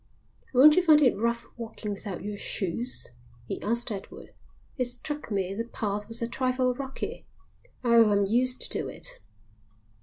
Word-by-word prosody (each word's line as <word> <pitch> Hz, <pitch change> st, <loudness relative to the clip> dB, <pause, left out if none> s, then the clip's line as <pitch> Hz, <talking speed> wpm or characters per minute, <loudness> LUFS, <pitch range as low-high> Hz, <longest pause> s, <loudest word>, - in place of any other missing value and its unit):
"Won't 285 Hz, +4 st, +8 dB
you -, -, +7 dB
find 315 Hz, -4 st, +6 dB
it 265 Hz, -5 st, +4 dB
rough 235 Hz, +3 st, -1 dB
walking 225 Hz, -2 st, -5 dB
without 200 Hz, -2 st, -5 dB
your 205 Hz, 0 st, -4 dB
shoes?" 205 Hz, +5 st, -2 dB, 0.4 s
he -, -, -5 dB
asked 235 Hz, +2 st, -1 dB
Edward. 200 Hz, -2 st, -8 dB, 0.4 s
"It 255 Hz, -, 0 dB
struck 270 Hz, +4 st, -4 dB
me 195 Hz, -3 st, -1 dB
the 230 Hz, +3 st, -3 dB
path 210 Hz, -3 st, -3 dB
was 230 Hz, +1 st, -2 dB
a -, -, 0 dB
trifle 255 Hz, 0 st, +1 dB
rocky." 270 Hz, +1 st, -6 dB, 0.6 s
"Oh, 235 Hz, -2 st, +6 dB
I'm 200 Hz, -1 st, +3 dB
used 250 Hz, +5 st, +1 dB
to -, -, -1 dB
it." -, -, -6 dB
235 Hz, 155 wpm, -28 LUFS, 205-255 Hz, 0.6 s, Won't